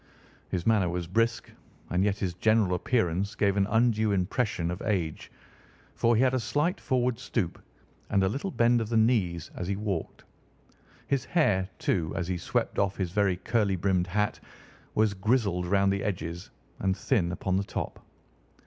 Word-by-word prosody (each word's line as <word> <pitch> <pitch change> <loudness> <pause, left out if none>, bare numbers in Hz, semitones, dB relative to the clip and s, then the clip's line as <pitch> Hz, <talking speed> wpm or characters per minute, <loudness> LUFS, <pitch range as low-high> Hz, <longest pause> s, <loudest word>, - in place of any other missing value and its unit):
His 90 -2 -2
manner 105 -6 +3
was 85 0 -2
brisk, 115 +5 0 0.4
and 90 +2 +2
yet 100 0 +1
his 95 -3 -2
general 110 +1 +2
appearance 100 0 0
gave 100 -1 +2
an 100 -1 +2
undue 110 -1 +2
impression 95 -2 0
of 90 - -5
age, 90 -8 -2 0.6
for 115 0 +2
he 115 - +4
had 130 0 +3
a 130 - +2
slight 145 - 0
forward 125 -2 0
stoop 115 -8 -2 0.5
and 100 -2 +2
a - - +3
little 140 - -2
bend 120 -6 +3
of 110 - -3
the 115 - +1
knees 105 -8 +1
as 90 - -5
he 100 - 0
walked. 100 -5 -4 0.8
His 140 -4 0
hair, 100 - +2
too, 80 -3 0
as 85 -3 -2
he 90 -1 -2
swept - - -1
off 100 -1 +1
his 90 -3 -2
very 95 -2 +2
curly 105 0 +1
brimmed 90 0 +1
hat, 105 +3 0 0.6
was 110 -1 +3
grizzled 100 -3 +1
round 100 +1 +3
the 100 - -2
edges 85 -3 -4 0.3
and 95 0 0
thin 95 -10 +1
upon 95 +1 -1
the 100 - 0
top. - - -5
100 Hz, 175 wpm, -28 LUFS, 90-115 Hz, 0.8 s, he